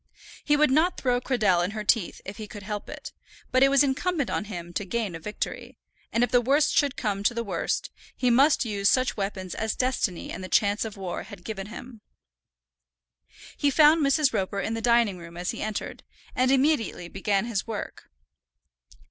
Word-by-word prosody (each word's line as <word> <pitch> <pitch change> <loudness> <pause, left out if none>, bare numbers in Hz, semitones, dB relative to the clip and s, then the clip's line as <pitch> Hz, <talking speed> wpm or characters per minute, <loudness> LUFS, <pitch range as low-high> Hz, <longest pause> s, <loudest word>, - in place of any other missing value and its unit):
He 295 -1 +3
would 300 -2 +4
not 320 +6 +3
throw 245 -1 +1
Cradell 210 -10 +2
in 180 - -2
her 215 - -3
teeth 210 -3 +1
if 195 0 -7
he 215 - -7
could 205 0 -10
help 210 +1 -5
it; - - -8 0.4
but 255 - +3
it 270 - +7
was 275 0 +5
incumbent 290 +1 0
on 210 - -1
him 175 -5 -7
to 205 - -2
gain 210 -1 -2
a 165 - -6
victory, 210 +6 -5 0.3
and 230 - +2
if 245 - 0
the 245 - +5
worst 285 +5 +2
should 280 -2 +2
come 205 -4 -1
to 220 +4 +1
the 235 - -1
worst, 200 - -2 0.3
he 250 -1 +2
must 275 +3 +4
use 200 -3 +1
such 255 0 +2
weapons 195 -3 -4
as 220 0 -2
destiny 250 -8 -1
and 185 - -6
the 185 - -7
chance 205 +1 +2
of 215 -2 -7
war 185 -3 -4
had 200 -5 -11
given 200 -2 -5
him. 235 +1 -10 1.5
He 290 - +2
found 305 +2 +5
Mrs. 275 -1 +3
Roper 200 -1 -1
in 220 - -2
the 225 - -3
dining 235 -5 +3
room 170 0 -11
as 180 +1 -2
he - - -7
entered, 215 -1 -4 0.3
and 255 +1 +2
immediately 265 - +1
began 195 +3 -1
his 230 -4 -2
work. 220 -3 -6
225 Hz, 200 wpm, -26 LUFS, 200-260 Hz, 1.5 s, it